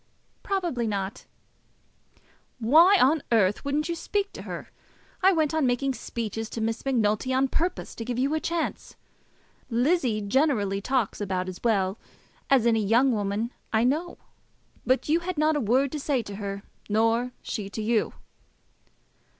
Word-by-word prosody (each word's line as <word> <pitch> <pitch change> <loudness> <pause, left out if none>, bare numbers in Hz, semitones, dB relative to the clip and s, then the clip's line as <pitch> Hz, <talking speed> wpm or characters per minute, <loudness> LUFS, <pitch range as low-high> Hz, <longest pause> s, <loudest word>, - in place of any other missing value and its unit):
"Probably 345 - -1
not." 195 -2 -4 1.3
"Why 320 - +6
on 295 +4 +4
earth 205 -4 +3
wouldn't 290 +2 -1
you 340 - -1
speak 400 +4 -2
to - - -8
her? - - -7 0.5
I 380 +1 +6
went 315 -4 +1
on 315 -4 +2
making 265 +2 0
speeches 225 -2 -5
to - - -5
Miss 225 +1 -2
Macnulty 235 -2 +1
on 260 +1 +2
purpose 345 +6 -2
to 230 - -6
give 245 +1 -3
you 270 +4 +1
a 315 - +1
chance. 335 +1 -3 0.7
Lizzie 245 -1 +1
generally 205 -3 +1
talks 250 -3 -1
about 185 -2 -2
as 185 -1 -6
well 200 -3 +1 0.5
as 265 -4 +4
any 225 -2 +3
young 240 +6 +4
woman 210 +1 -1 0.2
I 220 -1 +2
know; 310 +8 0 0.7
but 255 +1 +2
you 315 +3 +3
had 355 0 -4
not 305 +1 +3
a 295 - 0
word 255 +5 +2
to 300 - -4
say 275 -4 0
to 200 -2 -8
her, 200 -1 -5 0.3
nor 225 +3 +2
she 205 -3 -4
to 220 - -5
you." 225 0 +1
245 Hz, 160 wpm, -26 LUFS, 215-295 Hz, 1.3 s, Why